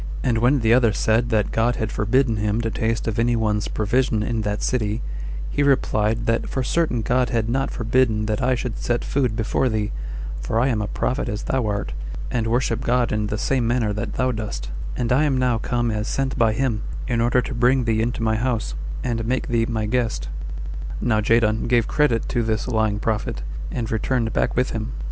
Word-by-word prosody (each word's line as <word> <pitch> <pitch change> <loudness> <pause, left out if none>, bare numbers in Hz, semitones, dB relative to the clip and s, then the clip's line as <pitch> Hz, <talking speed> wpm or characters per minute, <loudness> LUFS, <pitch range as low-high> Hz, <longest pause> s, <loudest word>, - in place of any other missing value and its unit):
And 120 -4 +2
when 125 +3 +3
the 115 0 +4
other 120 -3 +4
said 115 +3 +2
that 110 -3 +1
God 115 +2 +2
had 110 -1 -2
forbidden 115 +2 +2
him 105 +1 0
to 115 -1 -2
taste 115 +1 -1
of 115 0 -1
any 120 +1 +3
one's 105 -2 0
provision 110 +1 +1
in 115 0 -1
that 105 0 -2
city, 110 -3 0 0.5
he - - 0
replied, 115 -5 +2
that 115 0 0
"for 130 - -1
certain 130 -5 0
God 125 +2 +2
had 115 -3 0
not 135 +3 0
forbidden 115 -2 +1
that 105 -1 -1
I 130 0 +2
should 120 -2 -4
set 120 0 -1
food 125 -6 0
before 115 +3 +1
thee, 105 -2 -1 0.5
for 85 - 0
I 130 +3 +3
am 110 -4 0
a 105 - -2
prophet 130 +6 -1
as 105 - -3
thou 130 -4 0
art, 100 -11 -2 0.4
and 115 -2 0
worship 120 0 +1
God 125 -1 +1
in 105 0 0
the 105 - -2
same 125 +1 +1
manner 115 -3 +1
that 105 +3 -3
thou 130 0 +1
dost; 65 - -5 0.3
and 120 -1 -1
I 135 +4 +4
am 140 -3 +1
now 125 -3 +2
come 120 0 0
as 105 0 -2
sent 135 0 -1
by 115 -2 +3
him, 120 -3 0 0.3
in 120 -2 +1
order 120 +2 +3
to - - -5
bring 125 +2 +3
thee 110 -1 +1
into 115 0 -1
my 110 0 +2
house, 115 - -1 0.3
and 115 -2 -1
make 125 +3 -1
thee 115 -1 +2
my 110 -2 -1
guest." 110 - -1 0.7
Now 110 -3 +2
Jadon 110 0 +2
gave 120 -1 +3
credit 145 -7 +2
to 120 - +1
this 110 0 -1
lying 110 -4 +1
prophet, 105 - -2 0.3
and 115 -2 -3
returned 115 +1 0
back - - +1
with 125 +1 +1
him. 110 +2 -4
115 Hz, 210 wpm, -23 LUFS, 110-125 Hz, 0.7 s, the